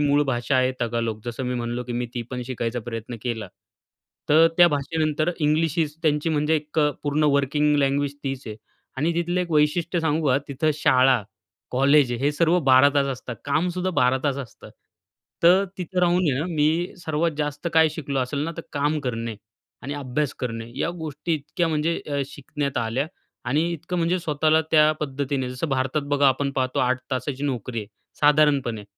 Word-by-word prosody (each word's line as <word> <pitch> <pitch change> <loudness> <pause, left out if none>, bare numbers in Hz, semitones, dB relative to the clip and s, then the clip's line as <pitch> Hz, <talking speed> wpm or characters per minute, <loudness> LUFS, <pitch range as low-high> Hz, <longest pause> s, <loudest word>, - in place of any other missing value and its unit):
मूळ 145 0 +3
भाषा 120 +2 0
आहे 130 0 +2
तगालोक. 115 -2 -2
जसं 120 +2 -4
मी 125 0 -2
म्हणालो, 120 0 -3
की 120 - -5
मी 120 +1 -2
ती 120 - -2
पण 125 -1 -4
शिकायचा 120 -1 -3
प्रयत्न 115 +1 -5
केला. 115 -5 -3 0.8
तर 160 +2 +6
त्या 175 - +8
भाषेनंतर 155 +2 0
इंग्लिश 155 +1 +2
हीच 150 -2 0
त्यांची 150 0 +1
म्हणजे 150 0 +1
एक 150 +1 -5
अ, 150 -1 +4
पूर्ण 150 +1 +1
वर्किंग 150 +2 +2
लँग्वेज 140 0 0
तीच 135 0 -3
आहे 110 -1 -6 0.4
आणि 155 +5 +1
तिथलं 175 +2 0
एक 175 -1 -4
वैशिष्ट्य 160 +3 +2
सांगू 160 -1 0
का 130 - +4
तिथे 150 +3 0
शाळा, 130 -4 +4 0.5
कॉलेज 135 0 +4
हे 140 +2 +2
सर्व 170 +3 +3
12 130 +2 +7
तास 140 -1 +3
असतात. 120 -1 -8
कामसुद्धा 180 +5 0
12 125 +1 +3
तास 140 -2 +1
असतं. 130 -4 -10 0.7
तर 185 +3 +6
तिथे 180 +1 -2
राहून 175 0 +3
आहे 130 - -1
ना, 160 - -2
मी 160 +4 +1
सर्वात 165 0 0
जास्त 145 +2 -2
काय 160 0 +6
शिकलो 145 -3 -4
असेल 130 +3 -2
ना 165 - -3
तर 165 - -5
काम 150 +2 0
करणे 115 -2 -3 0.5
आणि 140 +3 -4
अभ्यास 140 0 -2
करणे 115 -2 -4
या - - 0
गोष्टी 155 +1 -3
इतक्या 155 +3 -2
म्हणजे 160 +1 0
अ, 145 -1 -1
शिकण्यात 140 0 -5
आल्या 115 +5 -1 0.4
आणि 155 +6 +1
इतकं 170 +2 -5
म्हणजे 170 +2 +1
स्वतःला 155 -1 +2
त्या 155 -1 +6
पद्धतीने 135 -2 -2
जसं 125 +6 -3
भारतात 135 +2 0
बघा 140 -1 +5
आपण 140 +1 0
पाहतो 130 -1 -1
8 130 0 +1
तासाची 130 +2 -3
नोकरी 125 -3 -3
आहे 105 - -4 0.3
साधारणपणे. 145 -7 +3
145 Hz, 180 wpm, -24 LUFS, 130-155 Hz, 0.8 s, त्या